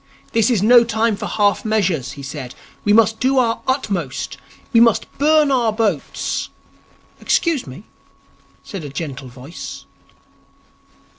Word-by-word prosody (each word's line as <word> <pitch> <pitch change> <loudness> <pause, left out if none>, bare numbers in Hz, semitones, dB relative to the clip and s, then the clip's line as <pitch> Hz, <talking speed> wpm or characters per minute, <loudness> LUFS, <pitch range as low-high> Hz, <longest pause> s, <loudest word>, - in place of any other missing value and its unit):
'This 225 +1 +2
is 220 -6 +1
no 240 +2 +7
time 225 -1 0
for - - -5
half 205 -2 +1
measures,' 190 - 0
he 140 - -10
said. 130 -2 -7 0.3
'We 205 - +3
must 220 0 +4
do 265 +1 +2
our 230 -3 +1
utmost. 200 - -2 0.4
We 230 - +6
must 230 -2 +4
burn 300 0 +4
our 240 -4 +2
boats 210 - -2 0.4
' - - -32
'Excuse 330 - +1
me,' 130 +9 -10 0.8
said 195 -6 -7
a 145 - -6
gentle 140 -2 -6
voice. 130 +6 -9
215 Hz, 140 wpm, -19 LUFS, 160-235 Hz, 0.8 s, no